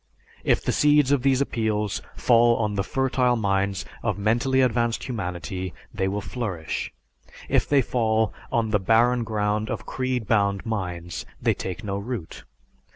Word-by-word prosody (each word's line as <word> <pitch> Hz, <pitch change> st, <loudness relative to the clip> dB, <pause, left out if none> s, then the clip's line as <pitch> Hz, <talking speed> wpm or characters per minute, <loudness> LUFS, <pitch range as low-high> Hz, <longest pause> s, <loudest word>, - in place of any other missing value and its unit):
If -, -, +2 dB
the -, -, 0 dB
seeds 150 Hz, -2 st, +4 dB
of 140 Hz, -3 st, +3 dB
these 135 Hz, 0 st, +3 dB
appeals 110 Hz, -6 st, -1 dB
fall 120 Hz, -1 st, +4 dB
on 105 Hz, -2 st, 0 dB
the 100 Hz, -1 st, 0 dB
fertile 130 Hz, +1 st, +1 dB
minds 100 Hz, -3 st, 0 dB, 0.2 s
of -, -, -1 dB
mentally 120 Hz, +6 st, +2 dB
advanced 120 Hz, -2 st, +1 dB
humanity, 90 Hz, -, -4 dB, 0.2 s
they 95 Hz, -, 0 dB
will 100 Hz, +2 st, -2 dB
flourish; 100 Hz, -10 st, -4 dB, 0.6 s
if -, -, +1 dB
they 140 Hz, -2 st, +4 dB
fall 110 Hz, -2 st, +1 dB, 0.2 s
on 115 Hz, -2 st, +1 dB
the 105 Hz, -, +3 dB
barren 115 Hz, +5 st, +3 dB
ground 105 Hz, -1 st, -1 dB
of -, -, -4 dB
creed 130 Hz, -3 st, -2 dB
bound 100 Hz, -2 st, +1 dB
minds, 90 Hz, -6 st, -4 dB, 0.2 s
they -, -, +2 dB
take 90 Hz, -3 st, -6 dB
no 100 Hz, -1 st, -2 dB
root. 105 Hz, -5 st, -6 dB
110 Hz, 155 wpm, -25 LUFS, 100-125 Hz, 0.6 s, seeds